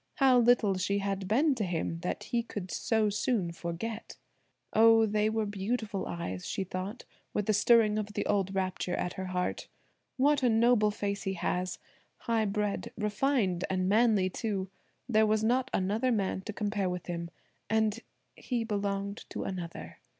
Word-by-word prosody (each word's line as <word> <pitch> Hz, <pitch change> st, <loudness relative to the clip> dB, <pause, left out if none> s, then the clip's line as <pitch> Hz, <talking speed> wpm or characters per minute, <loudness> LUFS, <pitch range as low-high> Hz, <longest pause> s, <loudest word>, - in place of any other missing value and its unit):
How 260 Hz, -3 st, +5 dB
little 230 Hz, -5 st, +4 dB
she 200 Hz, +2 st, 0 dB
had 195 Hz, -1 st, -2 dB
been 275 Hz, +9 st, +3 dB
to 235 Hz, -5 st, -2 dB
him 165 Hz, -2 st, -2 dB
that 180 Hz, -, -3 dB
he 235 Hz, -, 0 dB
could 205 Hz, -5 st, -6 dB
so 220 Hz, -2 st, +1 dB
soon 205 Hz, -4 st, 0 dB
forget. 185 Hz, +6 st, -5 dB, 0.6 s
Oh, 225 Hz, 0 st, +6 dB
they 210 Hz, 0 st, +1 dB
were 220 Hz, 0 st, 0 dB
beautiful 205 Hz, 0 st, -2 dB
eyes, 95 Hz, -, -5 dB
she 195 Hz, -, -2 dB
thought, 190 Hz, +5 st, -5 dB, 0.3 s
with 210 Hz, -, 0 dB
a -, -, +2 dB
stirring 215 Hz, 0 st, +4 dB
of 210 Hz, 0 st, -5 dB
the -, -, -2 dB
old 195 Hz, -1 st, 0 dB
rapture 185 Hz, -1 st, -1 dB
at 180 Hz, -, -2 dB
her 190 Hz, 0 st, -5 dB
heart. 180 Hz, 0 st, -2 dB, 0.5 s
What 285 Hz, +2 st, +3 dB
a 250 Hz, -, +3 dB
noble 225 Hz, -1 st, +4 dB
face 200 Hz, -1 st, -3 dB
he 195 Hz, -, -2 dB
has! 180 Hz, 0 st, -2 dB, 0.4 s
high 225 Hz, -2 st, +1 dB
bred, 210 Hz, 0 st, -2 dB
refined, 210 Hz, -3 st, +1 dB
and 185 Hz, -1 st, 0 dB
manly, 210 Hz, -2 st, +4 dB
too! 195 Hz, -1 st, -3 dB, 0.4 s
There 220 Hz, -3 st, +4 dB
was 215 Hz, 0 st, +2 dB
not 250 Hz, +3 st, +2 dB
another 215 Hz, +7 st, +1 dB
man 195 Hz, -4 st, 0 dB
to -, -, -2 dB
compare 205 Hz, -2 st, -1 dB
with 180 Hz, 0 st, -4 dB
him; 170 Hz, -1 st, -4 dB, 0.4 s
and–he 220 Hz, +2 st, -2 dB
belonged 200 Hz, -1 st, -3 dB
to -, -, -4 dB
another. 175 Hz, -3 st, -6 dB
205 Hz, 165 wpm, -30 LUFS, 190-225 Hz, 0.6 s, Oh